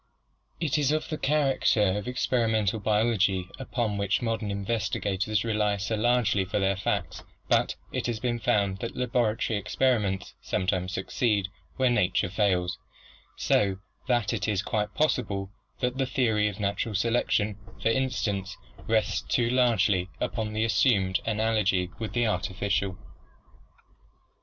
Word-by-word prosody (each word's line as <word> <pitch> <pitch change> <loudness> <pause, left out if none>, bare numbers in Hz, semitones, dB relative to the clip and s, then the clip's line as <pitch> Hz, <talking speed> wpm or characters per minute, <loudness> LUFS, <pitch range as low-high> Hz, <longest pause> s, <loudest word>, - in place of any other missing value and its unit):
It 155 -3 +1
is 145 -1 +2
of 155 0 -1
the 155 - -2
char 145 -2 +2
acter 105 -6 +2
of 105 -1 -4
experimental 115 -4 +1
biology 105 -3 +1
upon 120 -5 -2
which 100 0 +1
modern 115 -2 -1
investigators 100 0 -1
rely 105 -2 +1
so 100 +3 -2
largely 110 -3 +2
for 95 +3 -3
their 95 -1 +2
facts; 95 - -2 0.3
but - - +2 0.2
it - - -2
has 115 -2 -2
been 120 0 -1
found 100 -3 +1
that 115 - -5
laboratory 115 -3 0
experiments 100 -6 0
sometimes 90 0 -1
succeed 100 +1 0 0.3
where 130 -2 +2
nature 90 -5 +1
fails, 90 -3 0 0.6
so 100 -2 +2 0.3
that 120 -4 +1
it 95 -6 -2
is 105 -2 0
quite 105 -1 -2
possible 105 -10 0 0.3
that 125 +1 -1
the 135 - +1
theory 110 -5 +2
of 105 0 -5
natural 100 +2 -1
selection, 105 -1 +1 0.2
for - - +1
instance, 110 -7 -1 0.3
rests 110 -1 +1
too 120 -3 0
largely 105 -7 +2
upon 110 -2 -2
an 105 0 -6
assumed 105 -4 +3
analogy 105 -5 +1
with 110 -1 -4
the 120 -1 +2
artificial. 95 -2 -1
105 Hz, 140 wpm, -27 LUFS, 100-120 Hz, 0.6 s, assumed